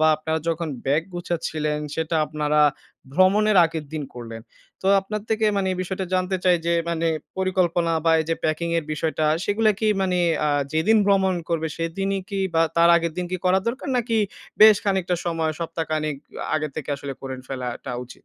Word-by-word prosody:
বা 155 - +5
আপনারা 160 +1 -2
যখন 165 0 -1 0.2
ব্যাগ 145 +4 +2
গুছাচ্ছিলেন 155 -3 -2 0.2
সেটা 160 +1 -1
আপনারা 150 0 0 0.5
ভ্রমণের 200 +4 +4
আগের 160 -1 -3
দিন 155 - -3
করলেন। 115 -2 -8 0.4
তো 190 - -2
আপনার 210 +2 -4
থেকে 220 0 +1
মানে 190 -1 +1
এই - - -4
বিষয়টা 190 0 -4
জানতে 185 +1 0
চাই 180 -1 +5
যে, 170 - +2 0.2
মানে 165 0 0 0.3
পরিকল্পনা 180 -3 +1
বা 165 - +4
এইযে 165 +1 -1
প্যাকিং 160 +2 0
এর 165 - -4
বিষয়টা 155 0 -1 0.2
সেগুলো 215 +2 +2
কি 220 - +1 0.2
মানে 180 -1 +1 0.3
আ - - +2 0.2
যেদিন 205 +8 +3
ভ্রমণ 190 -2 +3
করবে 160 -1 -1
সেদিনই 195 +4 -2
কি 195 - -2
বা 165 - +4
তার 170 0 +6
আগের 170 -1 -1
দিন 180 - -2
কি 185 - +1
করা 185 +1 +4
দরকার? 255 +5 -3
নাকি 235 -1 0 0.4
বেশ 215 -1 +9
খানিকটা 190 -3 +1
সময়, 165 -2 0
সপ্তাহ 165 0 -3
খানেক 155 -2 -1 0.4
আগে 155 -1 0
থেকে 155 - -6
আসলে 140 -1 -6
করেন 130 -1 -6
ফেলাটা 125 -2 -5
উচিত? 125 - -15
170 Hz, 180 wpm, -23 LUFS, 155-190 Hz, 0.5 s, বেশ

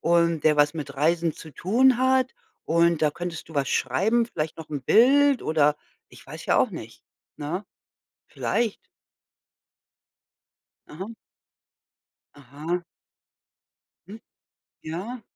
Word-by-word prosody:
und 170 -2 +2
der 150 -1 +4
was 145 +1 +3
mit 145 -3 -6
Reisen 165 +3 +1
zu 160 - -12
tun 240 - +3
hat 260 0 +2 0.3
und 170 0 +2
da 150 - +4
könntest 170 0 -6
du 160 - -13
was 140 -1 0
schreiben, 220 - +1
vielleicht 155 -8 -4
noch 160 -1 -10
'n 145 -3 -4
Bild 275 - +5
oder 150 -1 +2 0.3
ich - - -17
weiß - - -9
ja - - +3
auch - - +2
nicht, - - -10 0.3
ne, 165 +7 -4 0.6
vielleicht? 230 -3 -2 2.0
Aha. 185 +7 -7 1.3
Aha. 150 +6 -5 1.2
Mhm. 220 +3 -11 0.6
Ja. 195 +10 -6
170 Hz, 115 wpm, -25 LUFS, 150-225 Hz, 2.0 s, Bild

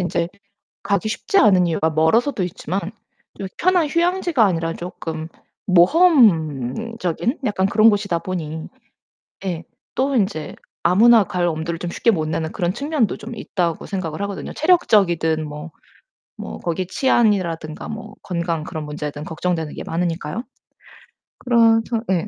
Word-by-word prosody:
인제 175 -1 -1 0.5
가기 200 +2 0
쉽지 390 - 0
않은 185 - +5
이유가 160 -1 +1
멀어서도 195 - +2
있지만 180 +2 -3 0.6
요 195 - -3
편한 360 -3 +3
휴양지가 345 - +2
아니라 165 -3 0
쪼끔 160 -2 -6 0.4
모험적인 190 - +3
약간 190 -2 +1
그런 215 +3 +5
곳이다 200 -5 -1
보니 160 -4 -5 0.8
예 175 -3 -3 0.3
또 270 +1 +1
인제 195 -8 -1 0.3
아무나 220 +5 +6
갈 180 -1 -1
엄두를 165 +1 -3
좀 175 - -4
쉽게 230 +6 +2
못 155 -5 -1
내는 160 0 -2
그런 175 0 -1
측면도 280 - -1
좀 235 +2 -8
있다고 175 -6 -2
생각을 185 -4 -4
하거든요. 200 -1 -5
체력적이든 175 - +2
뭐 150 +3 -8 0.7
뭐 - - -7
거기 175 +1 -3
치안이라든가 185 - 0
뭐 220 -1 -7
건강 170 -3 -3
그런 155 -1 -5
문제든 150 0 -5
걱정되는 160 -1 -2
게 - - -7
많으니까요. 170 +3 -2 1.0
그래서 230 -2 +4 0.3
예. 180 +2 0
180 Hz, 305 characters per minute, -21 LUFS, 165-225 Hz, 1.0 s, 아무나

